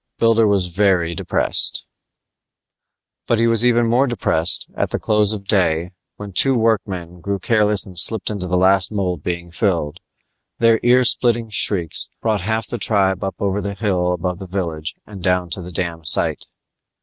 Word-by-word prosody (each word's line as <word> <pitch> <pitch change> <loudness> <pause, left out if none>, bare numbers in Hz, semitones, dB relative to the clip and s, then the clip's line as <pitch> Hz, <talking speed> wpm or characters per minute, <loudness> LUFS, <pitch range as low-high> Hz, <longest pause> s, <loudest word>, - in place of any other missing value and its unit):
Builder 115 -1 +3
was 100 -3 +2
very 90 -2 +1
depressed - - -1 1.4
But 115 - +2
he 115 - +2
was 115 -1 +3
even 120 -1 +3
more 120 +4 +2
depressed 90 -8 0
when, - - -6
at - - 0
the - - -1
close 105 -1 +1
of 100 -2 -5
day, 90 -4 +1 0.4
two 135 +8 +4
workmen 95 -7 -1
grew 100 +3 -2
careless 105 +1 +1
and 95 -3 -13
slipped 110 +6 +3
into 100 -3 -5
the 90 0 0
last 95 +1 +3
mold 90 -6 -2
being 85 +1 -5
filled; 85 -5 -1 0.6
their 115 -1 +3
ear 125 +1 +4
splitting 120 -1 +2
shrieks 90 -5 +1
brought 110 -3 -1
half 110 +3 -1
the 120 - -5
tribe 95 -3 0
up 95 - -3
over 100 0 -1
the 100 0 -5
hill 90 -4 0
above 90 0 -3
the 95 - -8
village 85 -5 -4
and 100 -3 -11
down 90 -1 0
to 90 - -3
the 90 +1 -9
dam 85 -1 -4
sight. - - +1
100 Hz, 175 wpm, -19 LUFS, 90-110 Hz, 1.4 s, two